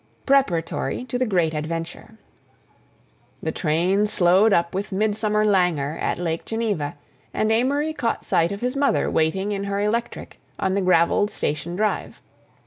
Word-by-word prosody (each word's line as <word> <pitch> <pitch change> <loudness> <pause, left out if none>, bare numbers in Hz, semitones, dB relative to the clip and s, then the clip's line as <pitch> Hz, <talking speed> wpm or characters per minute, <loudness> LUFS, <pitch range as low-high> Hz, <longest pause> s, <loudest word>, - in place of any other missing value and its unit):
PREPARATORY 250 -4 +1
TO 245 0 -3
THE 255 - +1
GREAT 175 -6 +1
ADVENTURE 165 +7 -5 1.3
The - - -1
train 180 +6 +1
slowed 195 +2 +4
up 170 -2 +2
with 200 +3 -3
midsummer 215 +1 +1
languor 175 -8 +1
at - - -1
Lake 165 -2 -2
Geneva, 210 -10 -2 0.4
and 215 0 +1
Amory 285 +7 +1
caught 235 -6 -2
sight 165 +2 +2
of 200 - -5
his 250 +2 -1
mother 280 0 +1
waiting 190 +6 0
in 200 -1 -2
her 200 0 -2
electric 230 +3 -3 0.2
on 190 - 0
the 200 - +1
gravelled 185 +2 +3
station 170 +1 -3
drive. 210 +2 -2
200 Hz, 145 wpm, -23 LUFS, 170-220 Hz, 1.3 s, slowed